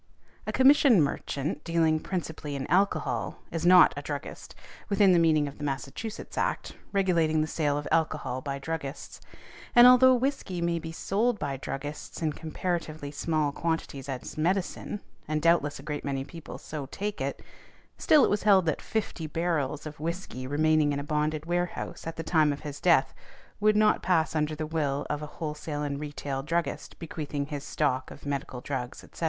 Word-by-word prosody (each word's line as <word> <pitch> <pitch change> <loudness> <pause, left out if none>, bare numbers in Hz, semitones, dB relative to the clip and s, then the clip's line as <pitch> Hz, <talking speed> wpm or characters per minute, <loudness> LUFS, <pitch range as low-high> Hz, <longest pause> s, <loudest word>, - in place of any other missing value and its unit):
A - - 0
commission 265 - +6
merchant, 145 0 -1
dealing 165 -2 +2
principally 160 -5 -4
in 135 -1 -3
alcohol, 195 +3 +1 0.2
is 165 +1 -1
not 180 0 +8
a 145 - -4
druggist, 145 -1 -6 0.3
within 200 -1 +5
the 175 - +5
meaning 155 -3 +3
of 140 - -9
the - - -6
Massachusetts' 145 - -4
Act, - - -1 0.2
regulating 170 -6 +2
the - - +1
sale 150 -2 0
of 145 - -4
alcohol 155 -5 0
by 140 0 -3
druggists; 140 0 -6 0.5
and 240 0 +10
although 255 +1 +8
whiskey 250 -8 -2
may 170 0 0
be 160 0 -6
sold 210 +7 0
by 145 -5 -3
druggists 145 +2 -6
in 155 -2 0
comparatively 155 -2 -4
small 155 0 0
quantities 145 -4 -3
as 135 +3 -5
medicine, 190 +4 -1 0.3
and 155 0 0
doubtless 160 -3 +2
a 135 - -11
great 150 0 -4
many 135 -1 -2
people 165 +3 -9
so 150 -3 -6
take 205 +8 -4
it, - - -2 0.6
still 300 -3 +5
it - - +4
was 205 - +1
held 195 -3 +5
that 155 - 0
fifty 200 -7 -3
barrels 155 -3 -1
of 150 -1 -8
whiskey 160 -6 -4
remaining 155 +1 +3
in 140 - -2
a - - -4
bonded 150 +1 -1
warehouse 175 -1 -3
at 165 - -4
the 165 - -5
time 155 -2 +3
of 145 - -5
his 145 -1 -7
death 170 -7 +4 0.5
would 215 0 +4
not 215 0 +4
pass 165 -3 +1
under 155 0 0
the 155 0 -3
will 150 -3 -1
of 150 0 -2
a 150 - -5
wholesale 150 -1 -4
and 140 -1 -3
retail 145 -2 -4
druggist 165 +4 -2
bequeathing 150 -3 -4
his 145 -1 -5
stock 130 -4 -1
of 145 - -12
medical 140 -3 -3
drugs, 125 -2 -5
etc. - - -15
155 Hz, 180 wpm, -28 LUFS, 145-175 Hz, 0.6 s, and